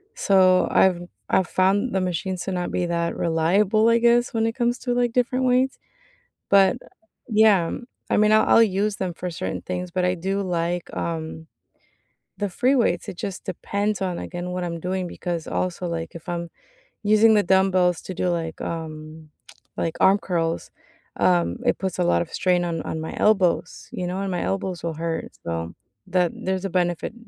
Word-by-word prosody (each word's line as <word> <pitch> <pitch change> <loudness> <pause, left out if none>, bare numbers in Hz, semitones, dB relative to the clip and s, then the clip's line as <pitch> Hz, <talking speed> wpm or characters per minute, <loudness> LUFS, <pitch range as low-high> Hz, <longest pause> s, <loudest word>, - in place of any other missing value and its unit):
So, 185 - +4
I've 180 -2 +4 0.3
I've 185 - +2
found 200 +6 +1
the 190 - +2
machines 180 0 -2
to 195 - -4
not 180 -1 -2
be 180 - 0
that 170 0 -1
reliable, 190 +7 +2
I 230 - +5
guess, 240 +1 +3
when 225 0 +1
it 225 - 0
comes 240 -1 0
to, 245 - -2
like, 245 -1 +1
different 255 +1 +1
weights. 255 +2 +2 0.7
But 195 -1 +5 0.5
yeah. 210 -6 +4 0.4
I - - +3
mean, 215 0 +4
I'll 215 - +5
I'll 230 - +7
use 205 0 +1
them 185 -2 -3
for 180 - -5
certain 140 - -4
things, 180 0 -4
but 185 +1 -1
I 180 0 +2
do 190 +3 -2
like, 175 -1 -2
um, 160 -1 -4 0.9
the 205 -1 -1
free 255 +9 +2
weights. 235 -3 +1
It 200 - -6
just 195 0 -5
depends 200 +3 -2
on, 180 -2 -1
again, 175 0 -5
what 180 0 -3
I'm 170 -1 -4
doing 185 +2 -2
because, 170 -2 -4
also, 180 0 -2
like, 165 -1 -5
if 170 - -10
I'm 170 -1 -3 0.5
using 215 +1 +5
the 210 - +5
dumbbells 185 -2 +3
to 185 - -6
do, 180 0 -1
like, 165 -2 -3
um, 155 -1 -6 0.5
like 165 - -2
arm 195 +2 +5
curls, 165 -3 -2 0.5
um, 85 -1 +2
it - - +2
puts 190 -2 -3
a - - +3
lot 85 0 +2
of - - -6
strain 180 -1 +2
on 165 -2 -2
on 160 - -4
my 160 - -6
elbows, 190 -4 +1
you 180 - -4
know? 185 +2 -3
And 195 - -2
my 180 - -2
elbows 190 -3 -3
will 170 - -2
hurt. 165 0 -3
So 85 0 -4 0.3
that 180 -2 +1
there's 190 0 -3
a - - -1
benefit 175 +1 -1
180 Hz, 185 wpm, -23 LUFS, 170-200 Hz, 0.9 s, I'll